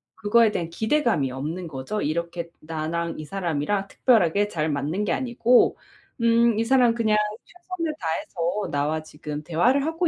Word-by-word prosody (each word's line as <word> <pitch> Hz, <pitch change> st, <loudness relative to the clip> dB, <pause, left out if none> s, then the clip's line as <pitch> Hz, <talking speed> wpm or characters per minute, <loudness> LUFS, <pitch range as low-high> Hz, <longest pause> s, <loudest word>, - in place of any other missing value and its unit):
그거에 225 Hz, +1 st, +3 dB
대한 170 Hz, -5 st, -3 dB
기대감이 220 Hz, -, +1 dB
없는 155 Hz, +7 st, -4 dB
거죠. 140 Hz, +8 st, -4 dB
이렇게 170 Hz, +2 st, -3 dB
나랑 165 Hz, +2 st, -3 dB
이 155 Hz, -, -6 dB
사람이랑 195 Hz, +2 st, -2 dB
특별하게 205 Hz, -4 st, +3 dB
잘 160 Hz, -5 st, -2 dB
맞는 150 Hz, +7 st, -1 dB
게 190 Hz, -, -1 dB
아니고 240 Hz, +2 st, +3 dB, 0.4 s
음 230 Hz, -1 st, +4 dB
이 225 Hz, -, +2 dB
사람 245 Hz, -1 st, +4 dB
그냥 220 Hz, -2 st, +2 dB, 0.3 s
최선을 350 Hz, -2 st, -5 dB
다해서 170 Hz, +4 st, -2 dB
나와 150 Hz, +2 st, -1 dB
지금 150 Hz, -1 st, -7 dB
대화를 245 Hz, -, +2 dB
하고 325 Hz, +2 st, 0 dB
185 Hz, 330 characters per minute, -24 LUFS, 155-230 Hz, 0.4 s, 음